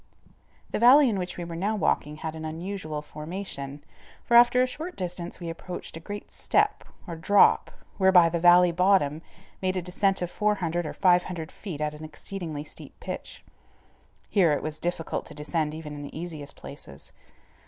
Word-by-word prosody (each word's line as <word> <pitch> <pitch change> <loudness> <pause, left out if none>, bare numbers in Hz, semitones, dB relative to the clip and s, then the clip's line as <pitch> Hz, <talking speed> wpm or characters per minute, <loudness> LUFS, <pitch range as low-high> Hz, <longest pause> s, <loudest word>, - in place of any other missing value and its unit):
The - - -1
valley 260 +4 +7
in 205 -4 -1
which 180 0 -4
we 175 - -4
were 170 -1 -6
now 200 +6 0
walking 150 -7 0
had 160 0 -5
an 160 - -7
unusual 160 -1 -5
formation, 150 -3 -6 0.4
for - - -3
after 245 +1 +7
a - - +3
short 315 +8 -6
distance 180 -1 -5
we 170 - -6
approached 165 +1 -7
a - - -6
great 205 +5 -8
step, - - +1 0.2
or 170 -4 -6
drop, 180 +6 +4 0.3
whereby 190 -3 +6
the 170 +1 -1
valley 175 +1 +7
bottom 170 -4 +2 0.4
made 185 0 0
a - - 0
descent 190 +1 +1
of 175 - -4
400 175 -6 0
or - - -5
500 180 -3 +2
feet 170 -8 -7
at 150 0 -1
an 150 +1 -10
exceedingly 155 -1 -6
steep 150 - -11
pitch. - - -7 0.8
Here 175 -7 +3
it - - -2
was 155 0 -4
difficult 175 -1 -2
to 150 - -11
descend 150 +1 -2
even 155 -2 -7
in 145 - -7
the 145 +2 -7
easiest 155 -4 -5
places. 70 - -11
175 Hz, 175 wpm, -27 LUFS, 155-190 Hz, 0.8 s, valley